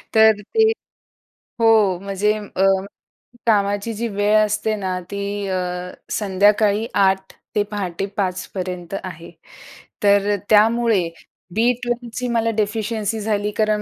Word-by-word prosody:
तर 220 Hz, -1 st, +6 dB
ते 440 Hz, -, +2 dB, 0.9 s
हो 225 Hz, -1 st, +5 dB, 0.3 s
म्हणजे 200 Hz, +1 st, 0 dB, 0.2 s
अ, 190 Hz, -, +2 dB, 0.8 s
कामाची 205 Hz, 0 st, +1 dB
जी 230 Hz, +2 st, -2 dB
वेळ 205 Hz, 0 st, +1 dB
असते 215 Hz, +1 st, -1 dB
ना, 185 Hz, -3 st, -3 dB
ती 200 Hz, 0 st, -3 dB
अ, 190 Hz, -1 st, -1 dB, 0.5 s
संध्याकाळी 205 Hz, +2 st, +2 dB, 0.2 s
8:00 190 Hz, 0 st, 0 dB, 0.2 s
ते 210 Hz, -, +3 dB
पहाटे 195 Hz, -3 st, -3 dB
5:00 185 Hz, -2 st, -1 dB
पर्यंत 180 Hz, -1 st, -5 dB
आहे. 170 Hz, -2 st, -8 dB, 0.7 s
तर 200 Hz, 0 st, +4 dB
अ, -, -, 0 dB
त्यामुळे 220 Hz, -3 st, +4 dB, 0.5 s
बी12ची 240 Hz, +1 st, -1 dB
मला 230 Hz, -1 st, +1 dB
डेफिशियन्सी 215 Hz, 0 st, -1 dB
झाली 210 Hz, -1 st, 0 dB
कारण 215 Hz, -1 st, +2 dB
210 Hz, 115 wpm, -21 LUFS, 195-220 Hz, 0.9 s, तर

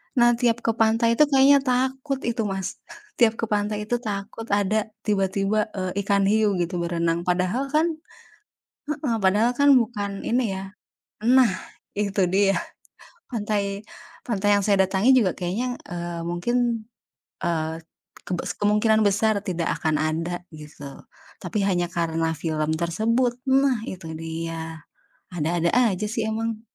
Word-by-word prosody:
Nah, 240 Hz, -1 st, +5 dB
tiap 240 Hz, -1 st, +1 dB
ke 230 Hz, -, +2 dB
pantai 230 Hz, +1 st, +3 dB
itu 300 Hz, -, +7 dB
kayaknya 280 Hz, 0 st, +6 dB
takut 265 Hz, +2 st, 0 dB
itu 230 Hz, -2 st, -1 dB
Mas. 195 Hz, -1 st, -4 dB, 0.4 s
Tiap 230 Hz, -2 st, +5 dB
ke 225 Hz, -, -2 dB
pantai 210 Hz, 0 st, 0 dB
itu 240 Hz, +3 st, -1 dB
takut 215 Hz, 0 st, -5 dB
ada 205 Hz, +2 st, +1 dB, 0.2 s
tiba-tiba, 200 Hz, 0 st, +1 dB
eee, 185 Hz, -2 st, -3 dB
ikan 200 Hz, -1 st, +2 dB
hiu 215 Hz, -1 st, +3 dB
gitu 175 Hz, +1 st, -2 dB
berenang. 170 Hz, 0 st, -1 dB
Padahal, 185 Hz, +9 st, 0 dB
kan 320 Hz, +1 st, +2 dB, 0.9 s
heeh. 290 Hz, -5 st, -2 dB
Padahal, 210 Hz, +4 st, +3 dB
kan, 285 Hz, 0 st, +6 dB
bukan 205 Hz, -5 st, 0 dB
ini, 235 Hz, -4 st, 0 dB
ya 190 Hz, 0 st, -6 dB, 0.5 s
nah, 245 Hz, -3 st, +5 dB, 0.4 s
itu 200 Hz, -2 st, +1 dB
dia. 195 Hz, +2 st, +2 dB, 0.7 s
Pantai 205 Hz, -3 st, -2 dB, 0.4 s
pantai 205 Hz, -3 st, +1 dB
yang 200 Hz, -, +2 dB
saya 195 Hz, -1 st, +3 dB
datangi 195 Hz, +6 st, +2 dB
juga 195 Hz, -7 st, +2 dB
kayaknya, 215 Hz, +8 st, -2 dB, 0.2 s
eee, 175 Hz, -1 st, -4 dB
mungkin, 230 Hz, +7 st, -1 dB, 0.6 s
eee, 160 Hz, -1 st, -2 dB, 0.4 s
kebes 180 Hz, -2 st, -3 dB
kemungkinan 210 Hz, +1 st, +3 dB
besar 205 Hz, +1 st, +2 dB
tidak 175 Hz, -2 st, -1 dB
akan 155 Hz, -1 st, +1 dB
ada, 165 Hz, +3 st, -2 dB
gitu. 150 Hz, -2 st, -12 dB, 0.6 s
Tapi 210 Hz, -, -2 dB
hanya 175 Hz, -3 st, +1 dB
karena 165 Hz, -1 st, -1 dB
film 155 Hz, 0 st, -2 dB
tersebut 230 Hz, +8 st, +1 dB
nah 265 Hz, -2 st, +3 dB
itu 175 Hz, -3 st, -7 dB
dia, 165 Hz, 0 st, -5 dB, 0.5 s
ada-ada 170 Hz, +1 st, 0 dB
aja, 220 Hz, -5 st, +2 dB
sih 225 Hz, -1 st, -2 dB
emang. 225 Hz, 0 st, -3 dB
205 Hz, 135 wpm, -24 LUFS, 175-230 Hz, 0.9 s, itu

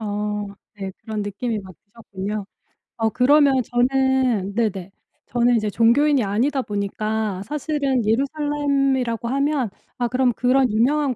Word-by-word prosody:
어 210 Hz, -1 st, -3 dB, 0.3 s
네 195 Hz, -2 st, -5 dB
그런 215 Hz, -1 st, -4 dB
느낌이 210 Hz, +3 st, -3 dB
막 190 Hz, -2 st, -10 dB
드셨군요. 205 Hz, -1 st, -6 dB, 0.5 s
어 225 Hz, -1 st, +1 dB
그러면 280 Hz, +3 st, +4 dB
저는 250 Hz, -4 st, +1 dB
네네 200 Hz, -5 st, -2 dB, 0.3 s
저는 240 Hz, 0 st, +2 dB
이제 215 Hz, -2 st, 0 dB
종교인이 260 Hz, +5 st, +3 dB
아니다 245 Hz, +8 st, 0 dB
보니까 210 Hz, -1 st, -2 dB
사실은 280 Hz, -2 st, -1 dB
예루살렘이라고 275 Hz, -1 st, 0 dB
하면 275 Hz, -2 st, 0 dB, 0.3 s
아 245 Hz, -2 st, 0 dB
그럼 250 Hz, 0 st, +2 dB
그런 255 Hz, +1 st, +2 dB
유명한 265 Hz, +5 st, +2 dB
240 Hz, 290 characters per minute, -22 LUFS, 210-270 Hz, 0.5 s, 그러면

